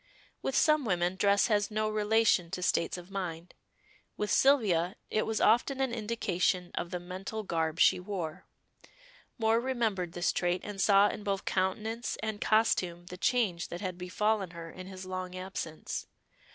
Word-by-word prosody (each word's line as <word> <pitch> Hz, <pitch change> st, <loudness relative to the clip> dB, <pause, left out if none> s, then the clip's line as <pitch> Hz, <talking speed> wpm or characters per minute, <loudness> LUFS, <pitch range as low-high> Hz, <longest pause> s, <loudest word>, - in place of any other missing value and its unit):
With 270 Hz, -, -2 dB
some 305 Hz, -2 st, +4 dB
women 180 Hz, -4 st, 0 dB
dress 200 Hz, +1 st, +3 dB
has 205 Hz, -3 st, +1 dB
no 215 Hz, 0 st, 0 dB
relation 215 Hz, -4 st, +2 dB
to 180 Hz, 0 st, -4 dB
states 175 Hz, -1 st, +1 dB
of 180 Hz, +2 st, -11 dB
mind; 175 Hz, -3 st, -5 dB, 0.6 s
with 210 Hz, -, -1 dB
Sylvia 205 Hz, -10 st, +3 dB, 0.2 s
it 215 Hz, -, +1 dB
was 220 Hz, -1 st, 0 dB
often 245 Hz, +5 st, +3 dB
an 265 Hz, -3 st, 0 dB
indication 205 Hz, -5 st, 0 dB
of 170 Hz, -, -3 dB
the 180 Hz, 0 st, -3 dB
mental 190 Hz, +5 st, -6 dB
garb 165 Hz, -3 st, -1 dB
she -, -, +5 dB
wore. 180 Hz, -5 st, -5 dB, 0.9 s
Moor 225 Hz, -1 st, +3 dB
remembered 225 Hz, -9 st, -1 dB
this 175 Hz, -, +1 dB
trait, 175 Hz, 0 st, 0 dB
and 205 Hz, -2 st, -5 dB
saw 200 Hz, +1 st, +6 dB
in 210 Hz, -, -6 dB
both 200 Hz, -1 st, -2 dB
countenance 215 Hz, +5 st, -1 dB
and 220 Hz, -1 st, -3 dB
costume 185 Hz, -6 st, +2 dB
the -, -, -5 dB
change 190 Hz, -6 st, +1 dB
that 175 Hz, -, -7 dB
had 185 Hz, -2 st, -4 dB
befallen 195 Hz, +1 st, 0 dB
her 165 Hz, -1 st, -7 dB
in 185 Hz, 0 st, -9 dB
his 190 Hz, -1 st, -8 dB
long 185 Hz, 0 st, -5 dB
absence. 185 Hz, -4 st, -5 dB
195 Hz, 165 wpm, -30 LUFS, 180-220 Hz, 0.9 s, saw